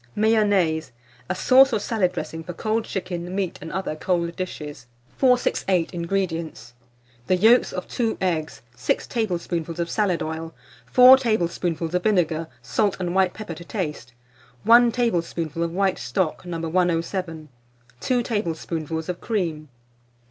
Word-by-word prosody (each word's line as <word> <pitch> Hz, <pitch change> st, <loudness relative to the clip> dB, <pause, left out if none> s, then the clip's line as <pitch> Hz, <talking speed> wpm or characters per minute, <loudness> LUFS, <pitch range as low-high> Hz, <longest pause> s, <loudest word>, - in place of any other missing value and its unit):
MAYONNAISE, 205 Hz, -, +2 dB, 0.4 s
a -, -, 0 dB
Sauce 265 Hz, +7 st, +6 dB
or 220 Hz, -, +1 dB
Salad 200 Hz, -4 st, 0 dB
Dressing 165 Hz, -2 st, -5 dB
for 175 Hz, +2 st, -7 dB
cold 220 Hz, +5 st, -1 dB
Chicken, 180 Hz, -1 st, -4 dB
Meat, 195 Hz, -3 st, -2 dB
and 160 Hz, -, -7 dB
other 190 Hz, -4 st, -3 dB
cold 170 Hz, +1 st, -1 dB
Dishes. 150 Hz, -8 st, -6 dB, 0.3 s
468. 245 Hz, -9 st, +2 dB
INGREDIENTS. 170 Hz, -8 st, -3 dB, 0.5 s
The 185 Hz, -, +3 dB
yolks 225 Hz, +7 st, +5 dB
of 185 Hz, -1 st, -5 dB
2 230 Hz, -2 st, -1 dB
eggs, 160 Hz, -7 st, -2 dB
6 125 Hz, -, -1 dB
tablespoonfuls 175 Hz, -7 st, -2 dB
of 170 Hz, 0 st, -2 dB
salad 195 Hz, -6 st, +1 dB
oil, 160 Hz, +1 st, -5 dB, 0.3 s
4 255 Hz, +1 st, +8 dB
tablespoonfuls 175 Hz, -8 st, -1 dB
of 180 Hz, -, +1 dB
vinegar, 165 Hz, -6 st, +1 dB, 0.2 s
salt 205 Hz, -3 st, 0 dB
and 175 Hz, -1 st, -2 dB
white 190 Hz, -1 st, +2 dB
pepper 215 Hz, -6 st, -6 dB
to 165 Hz, -, -10 dB
taste, 150 Hz, -, -5 dB, 0.5 s
1 235 Hz, +1 st, +6 dB
tablespoonful 170 Hz, -, -1 dB
of 170 Hz, 0 st, -1 dB
white 190 Hz, +1 st, 0 dB
stock, 180 Hz, -1 st, -2 dB
No. 170 Hz, -1 st, -3 dB
107, 165 Hz, -2 st, -1 dB, 0.5 s
2 250 Hz, -2 st, 0 dB
tablespoonfuls 165 Hz, -, -3 dB
of 180 Hz, -1 st, -4 dB
cream. 165 Hz, -9 st, -2 dB
180 Hz, 140 wpm, -23 LUFS, 165-210 Hz, 0.5 s, 4